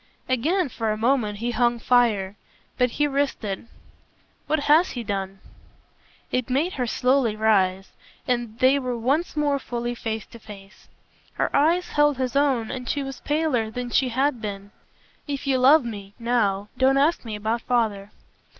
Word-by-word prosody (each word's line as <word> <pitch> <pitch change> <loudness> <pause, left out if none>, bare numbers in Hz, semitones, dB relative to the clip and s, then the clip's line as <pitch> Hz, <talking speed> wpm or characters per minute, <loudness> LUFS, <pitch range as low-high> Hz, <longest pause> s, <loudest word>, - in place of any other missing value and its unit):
Again 315 +8 +1
for 225 -3 -3
a 215 - -2
moment 225 -3 +1
he 235 +3 -2
hung 240 0 +1
fire, 225 -5 +2 0.4
but 250 -1 +2
he 295 +5 0
risked 280 -3 -1
it. 195 -2 -3 0.9
"What 310 -1 +1
HAS 310 +5 +4
he 240 - -4
done?" 195 -2 -4 0.9
It 255 -1 -1
made 295 +8 0
her 250 -2 -2
slowly 250 -2 +1
rise, 195 -3 +1 0.4
and 240 -3 -2
they 260 +3 +4
were 250 -2 -3
once 280 +8 -1
more 290 -2 +1
fully 240 -2 -4
face 225 -2 -4
to 235 - -12
face. 205 -2 -14 0.5
Her - - -1
eyes 335 +5 +2
held 295 -2 +2
his 255 -1 -2
own 270 -6 +1
and 250 -2 -6
she 285 - -1
was 270 -1 -7
paler 290 -7 0
than 245 +2 -5
she 260 0 +2
had 260 0 0
been. 200 -1 -6 0.6
"If 280 -1 -4
you 265 -2 +1
love 275 +2 +6
me 200 -3 -7
now 215 -4 0
don't 265 +1 +4
ask 300 +5 +2
me 220 -3 -5
about 220 +3 -2
father." 220 -5 -1
245 Hz, 170 wpm, -24 LUFS, 220-275 Hz, 0.9 s, love